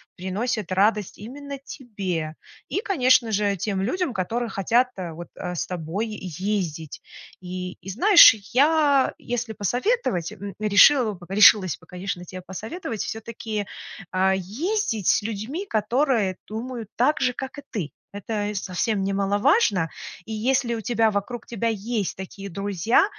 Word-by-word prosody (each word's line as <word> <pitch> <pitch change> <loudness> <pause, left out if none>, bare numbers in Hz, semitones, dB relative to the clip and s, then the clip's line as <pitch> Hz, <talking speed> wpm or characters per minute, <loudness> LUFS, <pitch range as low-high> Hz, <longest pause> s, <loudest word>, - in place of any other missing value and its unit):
приносит 195 +2 -3
радость 205 +1 +1
именно 280 +6 -7
тебе. 195 - -4 0.3
И, 395 - -2
конечно 255 - +3
же, 205 -1 +1
тем 195 +1 -2
людям, 345 - -1
которые 230 +5 -2
хотят, 235 +6 +2
э, 180 -3 -5
вот, 170 +1 -8
э, 180 - -5
с - - -2
тобой 180 +5 -3
ездить. 185 -5 -4 0.4
И 180 0 -5
и 185 - -9
знаешь, 340 - +8 0.2
я, 285 0 +4
если 240 -2 -3
посоветовать, 215 - 0
м, 200 -2 -8
решила 215 +4 +6
бы 175 -2 -12
решилась 195 -3 +6
бы, - - -20
конечно, 180 0 -5
тебе 185 +1 -8
посоветовать 220 - -6
все-таки, 220 -2 -5 0.4
а, 190 +1 +3
ездить 225 - -2
с - - +4
людьми, 225 - -4
которые 220 - +1
думают 230 0 -6
так 275 +6 +2
же, 255 -1 +2
как 265 +3 -6
и - - -8
ты. 170 - -3 0.2
Это 205 0 -3
совсем 195 +2 -1
немаловажно. 200 - +2 0.4
И 225 - -8
если 240 +2 +1
у 225 - -4
тебя 225 -1 +2
вокруг 210 +4 -3
тебя 230 -1 -2
есть 215 -2 -2
такие 195 +1 -8
друзья, 200 - +2
210 Hz, 140 wpm, -24 LUFS, 190-245 Hz, 0.4 s, знаешь